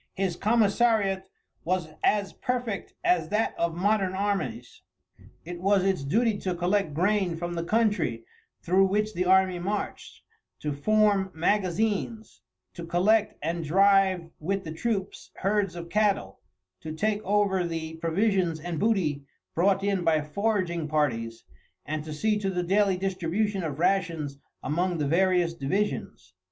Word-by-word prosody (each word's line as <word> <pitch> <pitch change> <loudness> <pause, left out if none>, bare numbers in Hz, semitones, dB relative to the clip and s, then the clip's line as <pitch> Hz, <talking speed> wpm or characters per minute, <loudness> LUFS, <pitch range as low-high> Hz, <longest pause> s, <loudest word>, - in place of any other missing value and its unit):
His 190 -3 -1
commissariat 205 -2 +2 0.3
was 180 -2 -1
as 205 -2 +1
perfect 245 -5 -3
as 360 0 +2
that 215 +2 0
of 170 -1 -1
modern 195 0 +1
armies. 190 - -3 0.6
It 175 0 -7
was 195 0 +3
its 190 -6 0
duty 215 - +1
to 185 -2 -2
collect 180 -2 0
grain 185 0 +1
from 175 +1 -4
the 170 -1 -2
country 185 - 0 0.4
through 190 +3 +4
which 210 +2 0
the 180 0 -1
army 190 -1 +4
marched, 200 +4 -4 0.4
to 150 -1 -2
form 205 +4 +2
magazines, 210 +5 -1 0.3
to 170 - -8
collect 195 +6 +2
and 165 +1 -2
drive 190 0 +3
with 195 +5 -2
the 160 - -6
troops 195 +1 -3
herds 195 -1 0
of 170 -1 -7
cattle, 200 - 0 0.4
to 155 0 -6
take 210 +6 0
over 200 -2 +1
the 165 -1 -4
provisions 175 0 +1
and 170 0 -4
booty 185 -10 +1 0.3
brought 195 +3 +2
in 200 -3 0
by 160 -2 +3
foraging 175 0 -1
parties, 115 -7 -1 0.4
and, 155 0 -3
to 155 - -7
see 210 +8 0
to 195 -2 -1
the 180 -2 -1
daily 195 +1 +2
distribution 190 +2 -1
of 155 -5 -4
rations 165 -6 0 0.2
among 175 +3 0
the 150 - -1
various 175 +1 +2
divisions. 135 - -3
185 Hz, 145 wpm, -27 LUFS, 165-205 Hz, 0.6 s, through